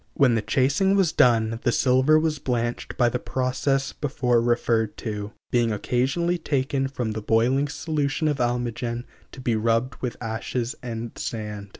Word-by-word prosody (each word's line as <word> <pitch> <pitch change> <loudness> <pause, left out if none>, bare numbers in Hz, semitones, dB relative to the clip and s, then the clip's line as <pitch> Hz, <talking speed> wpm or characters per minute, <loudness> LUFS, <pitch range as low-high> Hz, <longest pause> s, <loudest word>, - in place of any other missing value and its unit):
When 135 -4 +4
the 115 - +1
chasing 135 - +2
was 190 -5 +3
done 115 -2 +3
the 120 - +2
silver 130 +5 +4
was 155 -1 0
blanched 120 -2 -2
by 120 - +4
the 125 +1 -1
process 135 +2 -1
before 125 -4 +1
referred 115 -2 +1
to, 105 -2 -5 0.2
being 120 -2 +2
occasionally 135 - 0
taken 135 -2 0
from 125 -4 -3
the 110 0 -4
boiling 120 +6 +2
solution 150 0 -1
of 145 -2 +1
almogen 120 0 -1 0.3
to - - -11
be 120 -3 0
rubbed 115 +3 0
with 125 -2 -3
ashes 115 +1 -3
and 115 -2 -5
sand. 105 -3 -5
125 Hz, 160 wpm, -24 LUFS, 115-135 Hz, 0.3 s, When